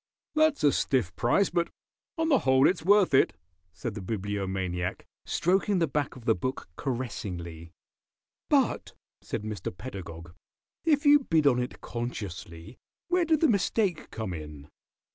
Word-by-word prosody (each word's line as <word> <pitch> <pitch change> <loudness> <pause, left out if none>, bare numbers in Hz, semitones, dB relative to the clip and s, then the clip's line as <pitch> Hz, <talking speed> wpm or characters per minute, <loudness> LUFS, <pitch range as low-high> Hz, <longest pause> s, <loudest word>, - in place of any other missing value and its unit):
"That's 310 -1 +3
a 145 - +6
stiff 120 -12 0
price, 185 +12 +2
but 170 -1 0 0.5
on 325 0 +1
the 275 -5 +5
whole 130 +1 +4
it's 180 - 0
worth 200 -2 +5
it," 135 - +5 0.4
said 95 +5 -5
the 105 - -6
Bibliomaniac, 95 -3 -3 0.2
stroking 190 +3 +2
the 170 - +3
back 145 -1 -2
of 125 -3 -12
the 115 - +4
book 130 +7 -4
caressingly. 90 - -5 0.8
"But," - - +1 0.3
said - - -4
Mr. 105 -5 -4
Pedagog, 85 -5 -8 0.5
"if 300 -2 +3
you 290 0 +8
bid 160 - +1
on 125 -3 +4
it 125 - -6
consciously 100 -6 -6 0.3
where 355 -1 +3
did 315 -2 +2
the 320 - +6
mistake 200 - +1
come 110 -5 -4
in?" 75 -3 -9
125 Hz, 145 wpm, -28 LUFS, -, 0.8 s, you